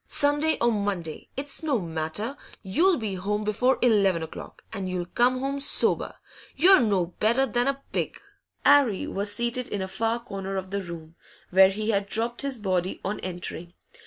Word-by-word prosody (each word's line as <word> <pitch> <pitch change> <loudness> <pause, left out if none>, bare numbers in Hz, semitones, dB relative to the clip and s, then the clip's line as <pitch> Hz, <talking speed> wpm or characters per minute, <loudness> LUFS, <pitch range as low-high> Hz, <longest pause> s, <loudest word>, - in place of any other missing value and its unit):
'Sunday 290 +2 +2
or 235 0 +4
Monday, 200 -7 -3
it's 280 +1 -1
no 290 -7 +1
matter; 165 - -3 0.3
you'll 330 - +3
be 215 -5 -3
home 205 +3 -2
before 245 +5 +2
eleven 200 -8 +3
o'clock, 160 - -9
and 195 -3 -4
you'll 180 -1 -2
come 245 +7 +2
home 275 +1 -2
sober. 280 - 0 0.4
You're 375 +6 +7
no 200 -7 +2
better 235 +5 +3
than 245 +1 0
a 275 0 -2
pig!' - - -2 0.5
'Arry 275 -9 +5
was 200 +1 -1
seated 240 +3 0
in 205 - -3
a - - -4
far 225 +5 -1
corner 195 -4 -6
of 190 0 -5
the 200 0 -1
room, 165 -3 -9 0.4
where 190 +1 +7
he 215 +3 -1
had 200 -1 0
dropped 235 +2 -1
his 275 -2 -1
body 185 -3 -1
on 205 +2 -2
entering. 175 -1 -5
210 Hz, 175 wpm, -26 LUFS, 190-255 Hz, 0.5 s, You're